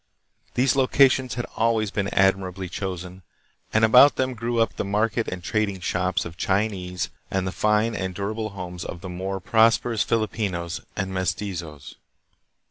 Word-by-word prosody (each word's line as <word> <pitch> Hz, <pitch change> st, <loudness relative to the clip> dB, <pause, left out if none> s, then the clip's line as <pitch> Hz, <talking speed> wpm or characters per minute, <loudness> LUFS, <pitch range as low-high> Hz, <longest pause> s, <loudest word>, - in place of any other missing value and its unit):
These 130 Hz, +2 st, +3 dB
locations 130 Hz, -1 st, +3 dB
had 120 Hz, -, -3 dB
always 110 Hz, -2 st, +1 dB
been 100 Hz, -2 st, -1 dB
admirably 95 Hz, -1 st, +1 dB
chosen, 90 Hz, 0 st, -5 dB, 0.5 s
and 110 Hz, +1 st, +4 dB
about 125 Hz, +5 st, +7 dB
them 130 Hz, 0 st, 0 dB
grew 115 Hz, 0 st, -2 dB
up 115 Hz, -, +1 dB
the -, -, -2 dB
market 110 Hz, +3 st, 0 dB
and 90 Hz, -1 st, -5 dB
trading 105 Hz, -2 st, -1 dB
shops 90 Hz, -1 st, -1 dB
of 85 Hz, 0 st, -8 dB
Chinese 95 Hz, -3 st, -1 dB, 0.2 s
and 95 Hz, -1 st, -1 dB
the 95 Hz, -, -2 dB
fine 105 Hz, +3 st, +1 dB
and 95 Hz, -3 st, -3 dB
durable 110 Hz, +3 st, -3 dB
homes 90 Hz, -3 st, -7 dB
of 85 Hz, -, -7 dB
the 90 Hz, -, -7 dB
more 95 Hz, +2 st, -4 dB
prosperous 115 Hz, +2 st, +3 dB
Filipinos 100 Hz, -6 st, -1 dB
and 95 Hz, 0 st, -3 dB
mes 95 Hz, -2 st, 0 dB
tizos. 85 Hz, -8 st, -7 dB
100 Hz, 155 wpm, -24 LUFS, 90-115 Hz, 0.5 s, about